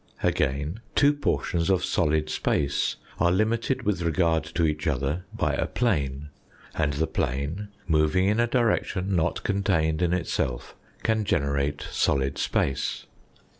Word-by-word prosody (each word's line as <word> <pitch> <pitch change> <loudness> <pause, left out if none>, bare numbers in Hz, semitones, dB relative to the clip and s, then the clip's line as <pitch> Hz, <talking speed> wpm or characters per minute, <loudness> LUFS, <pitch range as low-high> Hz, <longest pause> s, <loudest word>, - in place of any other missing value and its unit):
Again, 70 +9 0 0.2
two 145 0 +5
portions 85 - -1
of 95 -2 +2
solid 75 0 +1
space 70 -1 0 0.2
are 85 +1 +4
limited 115 +6 +1
with 105 -5 0
regard 85 -1 +2
to 85 - +3
each 75 0 -1
other 75 +5 -1
by - - -1
a - - 0
plane; 75 - -1 0.4
and 75 -2 0
the 75 +3 0
plane, 70 +10 -2 0.2
moving 75 +3 +3
in 105 +3 +2
a 120 - +3
direction 105 -5 +1
not 85 0 0
contained 90 -6 +1
in 85 -1 +2
itself, 65 -8 -2 0.3
can 110 -1 +1
generate 70 -6 0
solid 70 0 +1
space. 70 +1 -1
80 Hz, 135 wpm, -26 LUFS, 70-100 Hz, 0.4 s, two